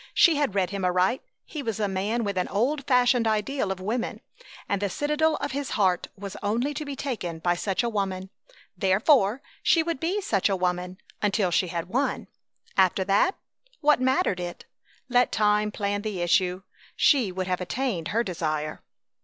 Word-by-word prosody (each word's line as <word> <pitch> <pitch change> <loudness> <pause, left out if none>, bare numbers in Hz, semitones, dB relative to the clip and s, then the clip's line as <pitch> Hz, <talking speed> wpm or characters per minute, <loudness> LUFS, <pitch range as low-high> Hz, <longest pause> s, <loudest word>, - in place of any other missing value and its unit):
She 335 - +6
had 285 -8 0
read 185 -2 +1
him 200 -1 -3
aright. 180 +6 +2 0.2
He 305 - -6
was 225 -5 -3
a 210 - +1
man 200 +5 -1
with 200 -2 -2
an 180 - 0
old 260 +8 0
fashioned 250 -2 +4
ideal 215 0 0
of 190 - -4
woman, 225 +6 -3 0.5
and 200 -1 -1
the 200 - 0
citadel 300 - +1
of - - -3
his 280 -1 -3
heart 185 -4 +2
was 200 -1 -7
only 235 +8 0
to 300 +2 -4
be 285 -2 -5
taken 220 -12 -4
by 175 +2 +1
such 190 +4 -1
a - - 0
woman. 195 -3 -2 0.4
Therefore, 215 +5 +3 0.2
she 330 - +4
would 335 -4 -2
be 360 +5 0
such 205 - +1
a 195 - +1
woman 180 0 -2 0.2
until 200 -3 +1
she 180 +2 +2
had 170 0 -3
won. 255 +9 -1 0.5
After 190 0 +3
that? 200 - +2 0.5
What 295 -3 +4
mattered 260 - +2
it? 175 -1 -6 0.4
Let 245 -1 +3
time 210 0 +2
plan 205 -1 -2
the 205 -4 -3
issue! 180 +1 +2 0.3
She 255 - +4
would 185 0 -3
have 185 0 -1
attained 185 -3 -2
her 230 +5 +1
desire! 155 -6 -3
205 Hz, 180 wpm, -26 LUFS, 185-255 Hz, 0.5 s, She